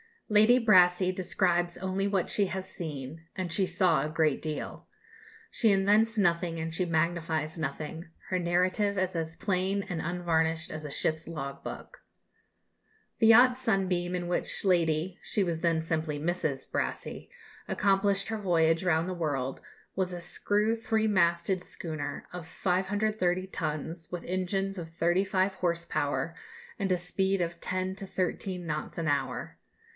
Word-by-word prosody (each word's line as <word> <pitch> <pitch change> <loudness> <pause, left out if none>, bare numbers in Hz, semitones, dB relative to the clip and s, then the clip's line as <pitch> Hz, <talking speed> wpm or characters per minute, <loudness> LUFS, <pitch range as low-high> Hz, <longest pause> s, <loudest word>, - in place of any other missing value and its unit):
Lady 215 +3 +6
Brassey 185 -2 +6
describes 175 -2 0
only 190 +1 -1
what 195 -3 0
she 205 - +2
has 190 0 -4
seen 160 -3 -6
and 185 -3 -3
she 190 +4 +2
saw 175 -4 +3
a 150 - -2
great 155 -2 +1
deal. 155 -1 -5 0.6
She 220 -4 +3
invents 210 +4 +3
nothing 170 -3 +2
and 160 0 -3
she 180 +3 0
magnifies 160 -1 0
nothing; 155 +2 -4 0.2
her 185 - +1
narrative 185 +4 +1
is 185 0 0
as 165 0 -3
plain 195 +1 0
and 170 -3 -2
unvarnished 165 -1 0
as 155 -1 -6
a - - -4
ship's 155 +2 -1
log 140 -4 -6
book. - - -8 1.2
The 225 - +5
yacht 245 +3 +7
Sunbeam 185 -7 0
in 175 -1 -3
which 180 - -1
Lady 170 0 +2
(she 205 - 0
was 170 -3 -1
then 165 -1 +2
simply 160 -2 -2
Mrs.) 155 -4 -2
Brassey - - -3 0.4
accomplished 195 0 +2
her 220 - -1
voyage 165 -3 +2
round 165 0 +2
the - - -2
world 140 -6 -2 0.4
was 185 -1 0
a 175 - -5
screw 210 +5 0
three 220 -1 +1
masted 175 -1 +2
schooner, 160 -4 -5
of 180 -2 -7
530 190 0 0
tons, 160 -1 -4
with 175 - -4
engines 195 +2 -1
of 165 -1 -8
thirty 175 +3 +2
five 190 0 +1
horse 170 -2 -1
power, 155 +2 -1 0.5
and 195 -1 0
a 180 - +3
speed 190 +2 0
of 170 0 -2
10 185 0 -2
to 195 -1 -6
13 185 0 -2
knots 155 -1 -4
an 165 -2 -1
hour. 145 -1 -2
180 Hz, 155 wpm, -29 LUFS, 165-195 Hz, 1.2 s, yacht